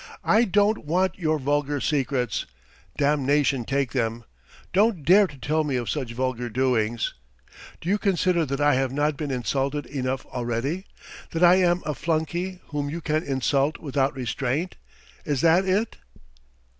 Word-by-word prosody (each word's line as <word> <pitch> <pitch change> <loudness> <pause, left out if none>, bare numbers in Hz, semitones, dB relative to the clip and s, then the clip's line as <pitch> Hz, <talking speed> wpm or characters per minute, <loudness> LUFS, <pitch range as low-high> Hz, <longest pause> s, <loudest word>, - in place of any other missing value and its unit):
"I 230 +2 +4
don't 205 -1 +2
want 185 +4 +1
your 155 -3 +1
vulgar 145 +1 0
secrets! 130 - -1 0.5
Damnation 140 -2 +2
take 135 -1 0
them! 115 -2 -1 0.5
Don't 195 -5 +2
dare 195 +4 +6
to 150 -4 -13
tell 155 +3 0
me 145 -3 -2
of 120 -1 -1
such 130 -6 -3
vulgar 125 -1 -2
doings! 120 -2 0 0.7
Do - - -9
you 205 +3 +2
consider 185 -4 +2
that 140 +1 -2
I 145 0 +4
have 130 0 +1
not 145 +2 0
been 145 0 -4
insulted 135 +3 -1
enough 130 -1 -3
already? 125 - -3 0.5
That 165 +2 0
I 175 +1 +7
am 180 -1 +2
a 150 - -1
flunkey 170 +4 -2
whom 145 -2 -2
you 165 +4 -4
can 155 -1 0
insult 140 +1 0
without 140 -2 -1
restraint? 135 +6 -2 0.5
Is 145 -4 -1
that 170 +3 +4
it?" 200 +4 0
145 Hz, 155 wpm, -25 LUFS, 130-170 Hz, 0.7 s, I